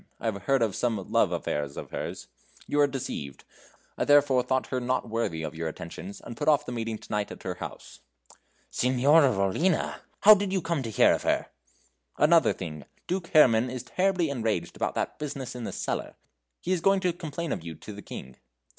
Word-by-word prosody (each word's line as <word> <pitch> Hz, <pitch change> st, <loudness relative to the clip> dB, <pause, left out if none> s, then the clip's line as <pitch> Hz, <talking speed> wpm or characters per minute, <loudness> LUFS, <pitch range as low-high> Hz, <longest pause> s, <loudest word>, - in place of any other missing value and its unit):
I -, -, -8 dB
have 105 Hz, -3 st, -1 dB
heard 135 Hz, -3 st, +3 dB
of 105 Hz, -4 st, -1 dB
some 110 Hz, -6 st, -2 dB
love -, -, +3 dB
affairs 75 Hz, -1 st, -3 dB
of -, -, -7 dB
hers. -, -, -5 dB, 0.4 s
You 145 Hz, -, -1 dB
are 145 Hz, -, +6 dB
deceived 125 Hz, -, -5 dB, 0.6 s
I -, -, +2 dB
therefore 145 Hz, -3 st, +5 dB
thought 130 Hz, +1 st, 0 dB
her 130 Hz, -, +1 dB
not 125 Hz, 0 st, -1 dB
worthy 110 Hz, -8 st, -2 dB
of 80 Hz, -, -4 dB
your 80 Hz, 0 st, -4 dB
attentions, 85 Hz, +4 st, -7 dB
and 120 Hz, -, -9 dB
put 145 Hz, -, -4 dB
off 150 Hz, -1 st, +4 dB
the -, -, -5 dB
meeting 115 Hz, -2 st, -3 dB
to -, -, -14 dB
night 105 Hz, -1 st, -1 dB
at -, -, -10 dB
her 90 Hz, -, -2 dB
house." -, -, -9 dB, 0.7 s
"Signora 135 Hz, +3 st, +4 dB
Rollina! 105 Hz, -, +1 dB, 0.2 s
How 215 Hz, -, +10 dB
did 200 Hz, -2 st, 0 dB
you 190 Hz, -, +1 dB
come 165 Hz, -3 st, -1 dB
to 115 Hz, -, -4 dB
hear 110 Hz, -, +5 dB
of -, -, -1 dB
her?" -, -, 0 dB, 0.7 s
"Another 165 Hz, +2 st, +5 dB
thing. 75 Hz, -5 st, -6 dB, 0.2 s
Duke 180 Hz, -1 st, -2 dB
Herrman 125 Hz, -7 st, +5 dB
is 125 Hz, -1 st, -5 dB
terribly 180 Hz, +2 st, +1 dB
enraged 110 Hz, -8 st, -2 dB
about -, -, -2 dB
that -, -, -2 dB
business 135 Hz, -4 st, -5 dB
in 125 Hz, -2 st, -6 dB
the -, -, -4 dB
cellar. -, -, -3 dB, 0.5 s
He 180 Hz, -, -3 dB
is 180 Hz, -3 st, +1 dB
going 195 Hz, +2 st, +3 dB
to 180 Hz, -2 st, +1 dB
complain 170 Hz, -1 st, -5 dB
of -, -, -3 dB
you 85 Hz, -1 st, -7 dB
to 105 Hz, -, -10 dB
the 100 Hz, -, -9 dB
King." 65 Hz, -8 st, -9 dB
125 Hz, 205 wpm, -27 LUFS, 105-155 Hz, 0.7 s, How